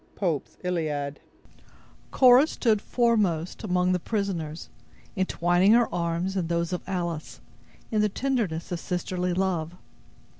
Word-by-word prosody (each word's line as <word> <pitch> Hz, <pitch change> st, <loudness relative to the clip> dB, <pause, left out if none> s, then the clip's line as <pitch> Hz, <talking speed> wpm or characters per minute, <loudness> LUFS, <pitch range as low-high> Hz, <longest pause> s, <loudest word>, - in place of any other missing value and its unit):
—Pope's 170 Hz, -8 st, -2 dB
Illiad 150 Hz, -5 st, -2 dB, 0.9 s
Cora 255 Hz, +3 st, +6 dB
stood 220 Hz, -8 st, +1 dB
foremost 210 Hz, -10 st, 0 dB
among 180 Hz, -2 st, +1 dB
the 180 Hz, -, +1 dB
prisoners, 175 Hz, -6 st, -3 dB, 0.5 s
entwining 185 Hz, +1 st, +3 dB
her 235 Hz, 0 st, +3 dB
arms 170 Hz, +2 st, -1 dB
in 180 Hz, -4 st, -1 dB
those 170 Hz, +1 st, -1 dB
of 180 Hz, -, -2 dB
Alice, 170 Hz, -4 st, -4 dB, 0.5 s
in 215 Hz, -1 st, +2 dB
the 210 Hz, -, +2 dB
tenderness 210 Hz, -10 st, -2 dB
of 175 Hz, -, -2 dB
sisterly 180 Hz, +1 st, -2 dB
love. 180 Hz, -3 st, -1 dB
180 Hz, 120 wpm, -26 LUFS, 170-205 Hz, 0.9 s, Cora